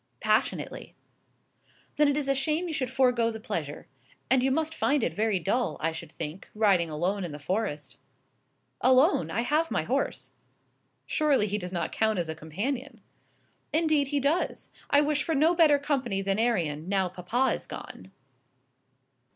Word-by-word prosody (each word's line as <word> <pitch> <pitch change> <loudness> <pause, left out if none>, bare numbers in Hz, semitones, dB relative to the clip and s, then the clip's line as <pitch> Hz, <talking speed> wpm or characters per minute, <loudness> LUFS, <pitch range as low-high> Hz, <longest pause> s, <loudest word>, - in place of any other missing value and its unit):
"Passionately." - - -1 1.0
"Then 300 - +4
it 285 0 +1
is 290 -2 -1
a 275 - +3
shame 305 +6 0
you 325 - -4
should 260 -5 -1
forego 250 -3 +2
the 220 -1 -6
pleasure. 165 - -4 0.5
And 260 -1 +5
you 265 - +2
must 315 +4 0
find 285 -4 +1
it - - 0
very 215 -1 +1
dull, 220 +8 -1
I 165 +1 0
should 165 -1 -8
think, 165 +3 -7
riding 195 -6 +3
alone 180 +6 -1
in 175 - -4
the 145 - -7
forest." 155 -1 -3 0.8
"Alone! 255 - +4
I 215 +8 -1
have 305 +6 +1
my - - 0
horse." - - -2 0.7
"Surely 295 -8 +2
he 210 0 -2
does 180 -2 -6
not 175 -2 -2
count 220 -1 +1
as 170 -2 -2
a - - -2
companion." 215 - -4 0.7
"Indeed 310 -3 +2
he 285 +1 0
does. 290 +6 -1 0.2
I 285 - +5
wish 295 0 +1
for 320 +2 -1
no 315 +5 +4
better 320 -4 +5
company 265 -9 -1
than 195 +1 0
Arion, 175 -9 0
now 195 -2 +1
papa 190 +9 0
is - - -6
gone." 95 +1 -9
235 Hz, 165 wpm, -28 LUFS, 180-285 Hz, 1.0 s, And